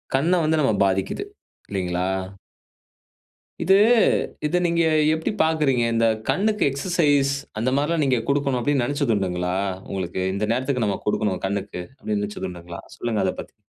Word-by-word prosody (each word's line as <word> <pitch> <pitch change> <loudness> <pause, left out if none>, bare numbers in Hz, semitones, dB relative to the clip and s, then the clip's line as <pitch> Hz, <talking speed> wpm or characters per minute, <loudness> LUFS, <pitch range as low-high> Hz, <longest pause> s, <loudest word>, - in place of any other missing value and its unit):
கண்ண 160 +7 +2
வந்து 155 0 +2
நம்ம 115 -6 +2
பாதிக்குது. 95 0 -1 0.5
இல்லேங்களா? 90 -2 -1 1.6
இது 190 +3 +5 0.7
இத 150 +4 +1
நீங்க 170 0 +2 0.3
எப்புடி 160 +4 -1
பாக்குறீங்க. 150 -6 +2
இந்த 115 0 +2 0.2
கண்ணுக்கு 210 +2 +1
எக்சர்சைஸ் 145 -2 +2 0.3
அந்த 120 +4 +1
மாரிலாம் 150 +2 +1
நீங்க 130 -3 +2
குடுக்கணும் 140 -2 +1
அப்டீன்னு 140 -1 +1
நெனச்சதுண்டுங்களா? 100 -10 -1 0.3
உங்களுக்கு 95 -2 -3 0.2
இந்த 105 - -1
நேரத்துக்கு 125 -2 0
நம்ம 100 - 0
குடுக்கணும் 105 -3 0
கண்ணுக்கு, 100 -2 -3 0.2
அப்டீன்னு 105 -1 -2
நெனச்சதுண்டுங்களா? 90 -4 -6 0.2
சொல்லுங்க 115 -3 -1
அதப் 95 - -2
பத்தி. - - -9
120 Hz, 130 wpm, -23 LUFS, 95-145 Hz, 1.6 s, இது